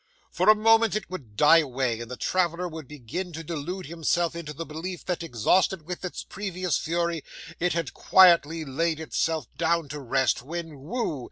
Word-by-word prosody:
For -, -, +2 dB
a 215 Hz, -, +9 dB
moment 225 Hz, 0 st, +4 dB
it 215 Hz, -, -4 dB
would 130 Hz, -, -8 dB
die 150 Hz, +8 st, +7 dB
away, 130 Hz, -5 st, -1 dB
and 120 Hz, 0 st, -7 dB
the 125 Hz, -, -6 dB
traveller 180 Hz, +2 st, 0 dB
would 160 Hz, -4 st, -8 dB
begin 150 Hz, +7 st, -6 dB
to 165 Hz, +1 st, -6 dB
delude 170 Hz, +4 st, -5 dB
himself 170 Hz, +2 st, 0 dB
into 165 Hz, -3 st, -6 dB
the 165 Hz, +3 st, -6 dB
belief 165 Hz, +4 st, -6 dB
that, 180 Hz, -2 st, -2 dB
exhausted 165 Hz, -, +1 dB
with 180 Hz, +3 st, -6 dB
its 180 Hz, -, -5 dB
previous 185 Hz, -4 st, -3 dB
fury, 170 Hz, -1 st, -1 dB, 0.4 s
it 180 Hz, +1 st, +1 dB
had 165 Hz, -4 st, -2 dB
quietly 165 Hz, -4 st, +5 dB
laid 160 Hz, +4 st, -1 dB
itself 160 Hz, 0 st, -1 dB
down 170 Hz, -2 st, +1 dB
to 150 Hz, +2 st, -5 dB
rest, 135 Hz, -1 st, +1 dB
when, 160 Hz, +1 st, -6 dB
whoo! 160 Hz, -, -3 dB
165 Hz, 180 wpm, -26 LUFS, 150-180 Hz, 0.4 s, a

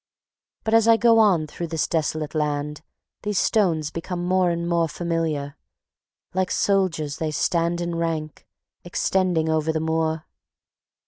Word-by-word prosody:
But 220 Hz, -, -1 dB
as 225 Hz, 0 st, +5 dB
I 230 Hz, -1 st, +7 dB
go 230 Hz, 0 st, +5 dB
on 190 Hz, -8 st, +4 dB
through 170 Hz, +3 st, -6 dB
this 165 Hz, -1 st, -1 dB
desolate 155 Hz, -2 st, -1 dB
land 150 Hz, -1 st, -2 dB, 0.4 s
these 210 Hz, -2 st, -2 dB
stones 165 Hz, -10 st, +2 dB
become 175 Hz, +2 st, -4 dB
more 185 Hz, 0 st, +2 dB
and 170 Hz, 0 st, -2 dB
more 170 Hz, -1 st, +2 dB
familiar. 155 Hz, -4 st, -2 dB, 0.8 s
Like 185 Hz, 0 st, 0 dB
soldiers 170 Hz, -7 st, 0 dB
they 160 Hz, -, -2 dB
stand 170 Hz, +3 st, 0 dB
in 170 Hz, 0 st, -2 dB
rank, 165 Hz, -2 st, -3 dB, 0.4 s
extending 175 Hz, -2 st, 0 dB
over 160 Hz, 0 st, +1 dB
the 160 Hz, -, -1 dB
moor. 160 Hz, 0 st, -1 dB
165 Hz, 140 wpm, -23 LUFS, 155-180 Hz, 0.8 s, I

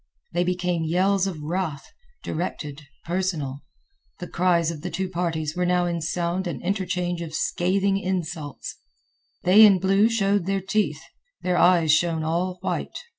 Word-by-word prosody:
They 175 Hz, +1 st, +2 dB
became 180 Hz, -2 st, -1 dB
yells 190 Hz, +4 st, +2 dB
of 160 Hz, -6 st, -5 dB
wrath, 160 Hz, -3 st, -3 dB, 0.4 s
directed, 155 Hz, -3 st, -4 dB, 0.2 s
personal. 165 Hz, -6 st, -2 dB, 0.6 s
The 175 Hz, -, -7 dB
cries 170 Hz, -2 st, +2 dB
of 155 Hz, -3 st, -8 dB
the 180 Hz, -, -4 dB
two 190 Hz, +2 st, -2 dB
parties 165 Hz, -4 st, -2 dB
were 180 Hz, -, 0 dB
now 180 Hz, 0 st, +2 dB
in 170 Hz, -1 st, -2 dB
sound 175 Hz, +3 st, -1 dB
an 155 Hz, -7 st, -4 dB
interchange 180 Hz, -2 st, -1 dB
of 160 Hz, -2 st, -6 dB
scathing 195 Hz, +4 st, +1 dB
insults. 175 Hz, -6 st, -4 dB, 0.7 s
They 195 Hz, +5 st, +7 dB
in 200 Hz, -3 st, +8 dB
blue 195 Hz, +4 st, +3 dB
showed 200 Hz, -4 st, +1 dB
their 195 Hz, 0 st, +1 dB
teeth; 210 Hz, +3 st, -1 dB, 0.4 s
their 180 Hz, -1 st, +1 dB
eyes 175 Hz, -3 st, +5 dB
shone 160 Hz, +1 st, +2 dB
all 175 Hz, +3 st, -1 dB
white. -, -, -3 dB
180 Hz, 150 wpm, -24 LUFS, 165-190 Hz, 0.7 s, in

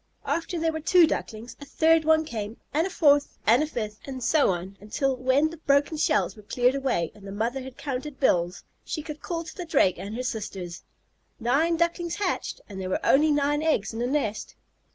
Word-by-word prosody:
After 335 Hz, +1 st, -2 dB
there 325 Hz, 0 st, +1 dB
were 315 Hz, -, -4 dB
two 350 Hz, +2 st, +6 dB
Ducklings, 230 Hz, -6 st, -4 dB
a -, -, -7 dB
third 320 Hz, +2 st, +3 dB
one 315 Hz, 0 st, +4 dB
came, 220 Hz, -4 st, -5 dB, 0.2 s
and 320 Hz, +5 st, +2 dB
a -, -, -6 dB
fourth, 290 Hz, -5 st, +3 dB
and 235 Hz, +5 st, +5 dB
a 305 Hz, -, 0 dB
fifth, 215 Hz, -7 st, -5 dB
and 260 Hz, -2 st, -6 dB
so 300 Hz, +4 st, +3 dB
on 185 Hz, +2 st, -3 dB
until, 265 Hz, +6 st, -1 dB
when 260 Hz, +5 st, +2 dB
the 330 Hz, -, -9 dB
broken 285 Hz, 0 st, +2 dB
shells 310 Hz, +1 st, +1 dB
were 215 Hz, -, -13 dB
cleared 245 Hz, +4 st, +1 dB
away 265 Hz, -12 st, -1 dB
and 200 Hz, -1 st, -13 dB
the -, -, -6 dB
mother 230 Hz, +6 st, -2 dB
had 260 Hz, 0 st, -10 dB
counted 275 Hz, +1 st, -5 dB
bills, 175 Hz, -8 st, +1 dB, 0.2 s
she 310 Hz, -, -4 dB
could 300 Hz, -1 st, -8 dB
call 335 Hz, -1 st, -3 dB
to -, -, -10 dB
the 360 Hz, -, -5 dB
Drake 285 Hz, -, +2 dB
and 205 Hz, +3 st, -6 dB
her 250 Hz, -, -3 dB
sisters, 195 Hz, -7 st, -5 dB, 0.6 s
"Nine 290 Hz, +8 st, +2 dB
Ducklings 340 Hz, 0 st, 0 dB
hatched, 400 Hz, -3 st, -2 dB
and 195 Hz, -2 st, -7 dB
there 185 Hz, -, -4 dB
were -, -, -2 dB
only 300 Hz, +3 st, +5 dB
nine 295 Hz, 0 st, +2 dB
eggs 300 Hz, -10 st, 0 dB
in 225 Hz, -, -5 dB
the 240 Hz, -, 0 dB
nest." 225 Hz, -7 st, -2 dB
275 Hz, 215 wpm, -26 LUFS, 220-315 Hz, 0.6 s, two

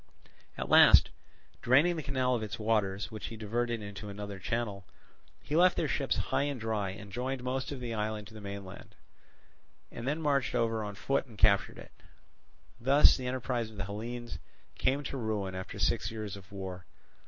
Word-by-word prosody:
At -, -, -3 dB
last, -, -, +8 dB, 0.5 s
draining 145 Hz, +8 st, +4 dB
the 160 Hz, -, -3 dB
canal 130 Hz, -3 st, 0 dB
of 120 Hz, -, 0 dB
its 105 Hz, -2 st, -4 dB
waters, 105 Hz, -2 st, 0 dB
which 110 Hz, -1 st, -6 dB
he 115 Hz, -, -8 dB
diverted 115 Hz, +1 st, -2 dB
into 100 Hz, +1 st, -7 dB
another 100 Hz, 0 st, -6 dB
channel, 105 Hz, -3 st, -3 dB, 0.6 s
he 150 Hz, -, -3 dB
left 180 Hz, +2 st, +5 dB
their 160 Hz, -, +1 dB
ships 135 Hz, +1 st, 0 dB
high -, -, 0 dB
and 140 Hz, -2 st, -1 dB
dry 110 Hz, -3 st, -1 dB
and 100 Hz, +1 st, -9 dB
joined 125 Hz, +3 st, -3 dB
most 130 Hz, +2 st, -2 dB
of 140 Hz, -, -5 dB
the 120 Hz, -2 st, -4 dB
island 105 Hz, -1 st, -2 dB
to 110 Hz, -, -14 dB
the 110 Hz, -, -10 dB
mainland, 100 Hz, -2 st, -8 dB, 1.0 s
and 120 Hz, +2 st, -6 dB
then 150 Hz, +3 st, 0 dB
marched 140 Hz, -5 st, +1 dB
over 115 Hz, -1 st, +1 dB
on 105 Hz, -1 st, -5 dB
foot 135 Hz, +7 st, 0 dB
and 110 Hz, -4 st, -14 dB
captured 100 Hz, -1 st, +3 dB
it. -, -, -11 dB, 0.9 s
Thus 135 Hz, +5 st, +6 dB
the 130 Hz, -2 st, -4 dB
enterprise 125 Hz, -2 st, -2 dB
of 110 Hz, -, -13 dB
the 100 Hz, -, -3 dB
Hellenes 120 Hz, +4 st, -6 dB, 0.4 s
came 140 Hz, +3 st, +1 dB
to 140 Hz, -, -4 dB
ruin 105 Hz, -5 st, -2 dB
after 95 Hz, 0 st, -6 dB
six -, -, +1 dB
years 110 Hz, -3 st, -5 dB
of 100 Hz, +1 st, -13 dB
war. 95 Hz, -3 st, -7 dB
110 Hz, 185 wpm, -31 LUFS, 100-130 Hz, 1.0 s, last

